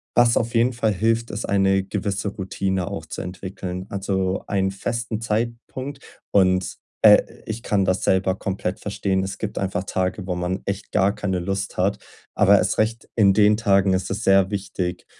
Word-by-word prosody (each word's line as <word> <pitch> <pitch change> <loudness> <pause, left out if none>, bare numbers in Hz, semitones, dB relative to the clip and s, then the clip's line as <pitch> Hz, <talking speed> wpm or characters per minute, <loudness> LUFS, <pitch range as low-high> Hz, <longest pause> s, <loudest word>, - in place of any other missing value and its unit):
was 120 -1 +5
auf 115 +1 -1
jeden 120 +2 +3
Fall 115 -2 +1
hilft, 115 +3 0
ist 105 - -4
eine 95 -1 +2
gewisse 100 0 -3
Routine 95 -1 -2
auch - - -5
zu - - -5
entwickeln. 90 0 -6
Also, 95 -1 -1
einen 95 -1 0
festen 115 +2 -3
Zeitpunkt. 120 +5 -3 0.3
Und, 95 -2 +2 0.3
äh, - - +9 0.2
ich 110 +1 -5
kann 100 -2 +1
das 95 0 0
selber 95 0 +2
komplett 95 -1 -3
verstehen. 95 -2 -1
Es 95 - -5
gibt 110 - -4
einfach 95 -1 -2
Tage, 95 +1 -2
wo 90 - -1
man 90 +2 -2
echt 100 0 -4
gar 100 +1 +3
keine 100 -3 -2
Lust 95 +2 -3
hat. 95 +2 +1 0.4
Aber - - +6
erst - - +1
recht 110 +1 0
in 100 -4 +5
den 105 +1 +4
Tagen 100 -3 +3
ist 95 - -1
es 105 +4 -3
sehr 95 -1 +4
wichtig, 95 -3 -3
100 Hz, 180 wpm, -23 LUFS, 95-110 Hz, 0.4 s, äh